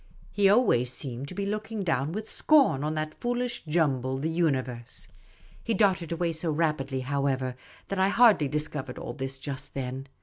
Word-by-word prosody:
He 205 - +1
seemed 195 - +7
always 130 - +3
to 135 +4 -5
be 200 +1 -2
looking 215 +1 -3
down 155 -4 0
with 215 +4 -5
scorn 275 - +3
on 155 +1 -1
that 155 0 -4
foolish 245 0 -2
jumble, 135 -5 +1
the 155 +4 -2
uni 160 -6 +2
verse. 125 -1 -9 0.5
He 230 - 0
darted 185 -6 +2
away 170 0 0
so 160 +1 -2
rapidly, 150 -4 0
however, 135 -1 -1 0.3
that 195 - -2
I 190 +1 +4
hardly 215 -9 +5
discovered 145 -3 -3
all 120 - -6
this 135 0 -4
just 135 0 -6
then. 135 0 -4
150 Hz, 175 wpm, -28 LUFS, 135-195 Hz, 0.5 s, seemed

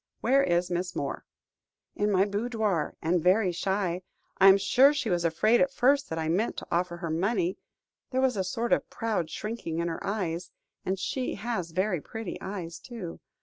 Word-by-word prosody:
Where 275 +1 +4
is 175 -4 +1
Miss 180 +1 -2
Moore?" - - -3 0.7
"In 205 0 +1
my 190 0 +4
boudoir, 210 -4 -1
and 170 +2 +2
very 185 +2 +3
shy. 185 0 -1 0.4
I 195 - +8
am 195 0 +9
sure 255 +9 +5
she 235 -8 -1
was 175 -1 +1
afraid 215 +8 +3
at 275 - +3
first 275 +2 +2
that 160 - -3
I 160 -1 -1
meant 190 +8 0
to - - -6
offer 175 0 0
her 170 -2 -4
money, 185 +2 0 0.5
there 260 - -1
was 260 -2 +2
a 190 - 0
sort 230 +6 -1
of - - 0
proud 215 -8 -2
shrinking 210 -6 -4
in 170 0 0
her 165 - -5
eyes 180 -4 -2 0.3
and 190 +1 -1
she 250 +7 -2
has 200 -5 -3
very 185 0 0
pretty 225 +2 -6
eyes, 180 -4 -5
too. 225 -9 -8
190 Hz, 190 wpm, -28 LUFS, 175-225 Hz, 0.7 s, am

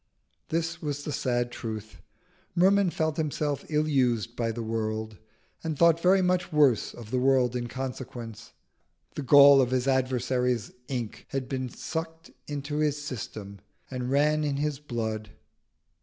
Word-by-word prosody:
This 165 0 -2
was 145 -1 -3
the 150 - -4
sad 120 -3 0
truth. 110 -2 -7 0.5
Merman 190 +2 +4
felt 160 -2 -1
himself 150 -2 -1
ill 155 0 +1
used 120 -5 +1
by 115 -1 -1
the 115 +1 -4
world, 110 -2 -3 0.4
and 160 -2 -2
thought 170 0 +5
very 185 +2 +4
much 180 0 +1
worse 145 -7 +3
of 115 -2 -10
the 130 - +1
world 130 -2 +3
in 120 -1 -2
consequence. 120 -3 -7 0.6
The - - -4
gall 140 0 +8
of 125 - +1
his 130 0 0
adversaries' 125 -2 +1 0.2
ink 120 -6 -5
had 135 -2 -3
been 130 -2 -3
sucked 160 +4 -6 0.2
into 145 0 -4
his 150 -1 +1
system 105 -7 -7 0.3
and 125 -1 -3
ran 150 +3 +3
in 145 -2 -1
his 145 -1 -1
blood. 110 -6 -4
135 Hz, 150 wpm, -27 LUFS, 120-150 Hz, 0.6 s, gall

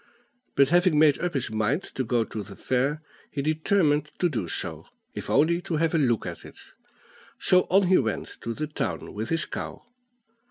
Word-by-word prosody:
But, 140 -1 +5
having 175 -1 +4
made 150 -2 +5
up 175 -3 -2
his 135 - -1
mind 110 - 0
to 130 - -1
go 120 -1 +1
to 110 -1 -6
the 100 -1 -10
fair, 135 +8 -1 0.3
he 140 - -3
determined 155 -1 +2
to 175 - +2
do 110 - -3
so, - - -4 0.3
if - - -6
only 170 +3 +3
to 170 - -3
have 165 +1 +1
a 165 - +3
look 120 -6 +1
at - - -6
it; - - -13 0.8
so 185 0 +4
on 195 +2 +5
he 185 +1 +5
went 110 -5 -3
to 115 0 -4
the 155 - -2
town 150 - -4
with 110 +2 -4
his 165 -1 +1
cow. - - -6
150 Hz, 195 wpm, -26 LUFS, 120-165 Hz, 0.8 s, But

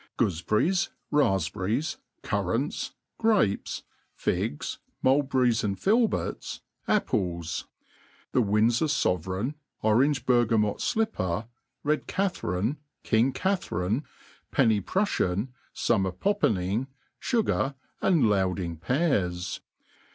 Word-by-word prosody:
Goofeberries, 110 - +1 0.2
rafpberries, 100 - +1 0.3
currants, - - -1 0.3
grapes, 210 - +1 0.3
figs, 75 - -2 0.2
mulberries 130 -3 +3
and 100 -2 -1
filberts, 225 +3 +1 0.3
apples; 90 - 0 0.6
the 125 - +3
Windfor 115 +7 +3
fovereign, 95 - 0 0.3
orange 125 +5 +3
burgamot 115 -4 +3
flipper, 110 - 0 0.4
red 150 +1 0
Catharine, 140 - -1 0.3
king 115 +4 +3
Catharine, 130 - -1 0.5
penny 115 -7 +3
prufltan, 110 - 0 0.2
fummer 95 -5 +1
poppening, 110 - +1 0.3
fugar, 210 - +1 0.3
and 170 -7 +4
louding 95 -5 +1
pears. 95 - 0
115 Hz, 80 wpm, -27 LUFS, 95-150 Hz, 0.6 s, and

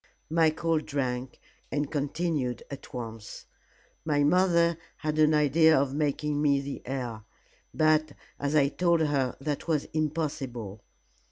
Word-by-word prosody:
Michael 160 0 +2
drank, 130 -4 -3 0.3
and 145 0 -1
continued 145 -3 -1
at 140 - -9
once. 115 -3 -7 0.6
"My 145 -2 +1
mother 170 0 +3 0.2
had 155 -1 -2
an 155 0 +5
idea 155 +1 +5
of 135 -1 0
making 150 0 -1
me 140 -2 +3
the 140 0 -6
heir. 125 -4 -4 0.5
But, 155 -1 +2 0.3
as 145 +2 -1
I 140 -2 +4
told 170 +2 +2
her, 140 -4 0
that 145 +3 -3
was 155 -4 +1
impossible. 140 -9 -3
145 Hz, 125 wpm, -28 LUFS, 135-155 Hz, 0.6 s, an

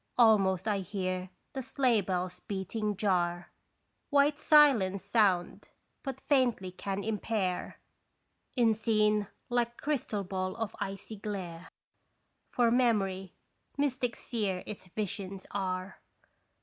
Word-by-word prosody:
Almost 205 -5 +4
I 205 -2 +1
hear 185 -1 -3 0.2
the 265 - -3
sleigh 250 -4 +2
bells' 180 -1 -2
beating 205 +1 -3
jar 175 -3 0 0.6
White 285 +1 +4
silence 230 -12 +5
sound 200 -4 +1 0.3
but 270 -2 -5
faintly 245 -10 +2
can 195 +2 -4
impair 210 -3 -2 0.8
In 235 -3 +4
scene 215 -1 +2 0.2
like 240 -1 0
crystal 255 -8 -1
ball 185 0 -3
of 225 -3 -4
icy 195 +3 -5
glare, 185 -5 -6 0.8
For 240 -2 +2
Memory, 195 -7 +1 0.4
mystic 260 -4 0
seer 205 -6 -2
its 205 -3 -8
visions 195 0 -4
are 185 -1 -3
205 Hz, 110 wpm, -31 LUFS, 185-235 Hz, 0.8 s, silence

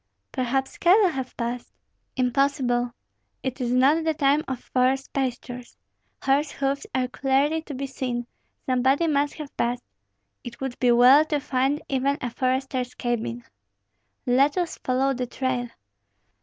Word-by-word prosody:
"Perhaps 265 +1 -2
cattle 380 +3 +5
have 265 -5 -5
passed." 240 0 -4 0.4
"Impossible. 250 -1 +1 0.5
It 260 0 -3
is 240 -1 -1
not 275 +6 +4
the 320 -1 0
time 285 +1 +3
of 260 -2 -3
forest 260 +1 +1
pastures; 250 -2 -4 0.5
horse 280 +2 +2
hoofs 275 0 -2
are 255 -1 +1
clearly 275 +5 +1
to 295 -3 -8
be 275 +2 -3
seen, 250 -3 -3 0.4
somebody 260 +5 +2
must 290 -2 +1
have 300 -3 -9
passed. 245 +1 -1 0.6
It 240 -1 -9
would 265 -2 -5
be 250 -1 +4
well 250 +5 +7
to 300 -2 0
find 275 +1 0
even 275 +1 0
a 245 - -4
forester's 255 0 -1
cabin." 220 - -2 0.8
"Let 275 +6 +3
us 350 -3 -2
follow 265 +2 +1
the 250 -1 -3
trail." 250 -1 -2
265 Hz, 140 wpm, -25 LUFS, 250-280 Hz, 0.8 s, well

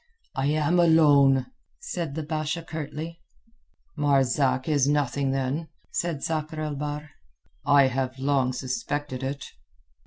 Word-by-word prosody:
"I 135 +1 0
am 155 +3 +2
alone," 145 -6 +5 0.3
said 165 -6 -4
the 160 - -3
Basha 155 +2 -2
curtly. 160 +1 -6 0.7
"Marzak 135 -3 +2
is 145 -4 +3
nothing, 140 -1 +1
then," 135 +4 -1 0.2
said 170 -5 -2
Sakr 155 -1 -2
el 155 -1 -2
Bahr. 150 +1 -5 0.6
"I 145 -1 +7
have 130 0 -1
long 135 -1 +1
suspected 130 +2 -3
it." 135 +1 -4
145 Hz, 120 wpm, -26 LUFS, 135-155 Hz, 0.7 s, I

